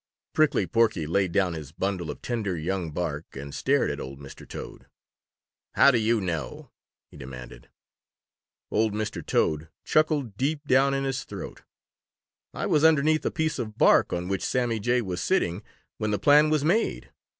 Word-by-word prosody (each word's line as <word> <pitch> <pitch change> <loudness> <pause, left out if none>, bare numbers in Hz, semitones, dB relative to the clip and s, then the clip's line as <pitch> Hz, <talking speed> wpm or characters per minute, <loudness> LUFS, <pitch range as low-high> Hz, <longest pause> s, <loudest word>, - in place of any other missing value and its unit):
Prickly 155 -1 +3
Porky 110 -8 +1
laid 90 +3 +1
down 90 -1 +1
his 75 -3 -7
bundle 90 -1 -3
of - - -7
tender 105 -7 -2
young 85 +1 -2
bark 80 -1 -4
and 70 +1 -7
stared - - +1
at - - -5
old 65 +1 -7
Mr. 70 -1 -12
Toad, - - -9 0.9
"How 140 +2 +7
do 120 - +2
you 110 +1 +2
know?" 80 -8 -4 0.4
he - - -13
demanded. 65 -2 -10 1.0
Old 110 0 +1
Mr. 110 0 -3
Toad 75 +1 0
chuckled 150 -8 +1
deep 145 +4 -1
down 135 +1 +3
in 135 - -1
his 135 -2 -2
throat. - - -8 0.9
"I - - -4
was 150 - +2
underneath 155 0 +4
a - - +2
piece 160 -2 -2
of 110 -2 -5
bark - - +5
on 90 0 -2
which 95 0 -2
Sammy 120 -3 0
Jay 120 +3 +1
was 90 -3 -4
sitting 100 - 0 0.4
when 110 -1 -1
the 105 - +1
plan 150 +4 +5
was 155 -1 +1
made. 205 +8 0
110 Hz, 170 wpm, -26 LUFS, 85-135 Hz, 1.0 s, How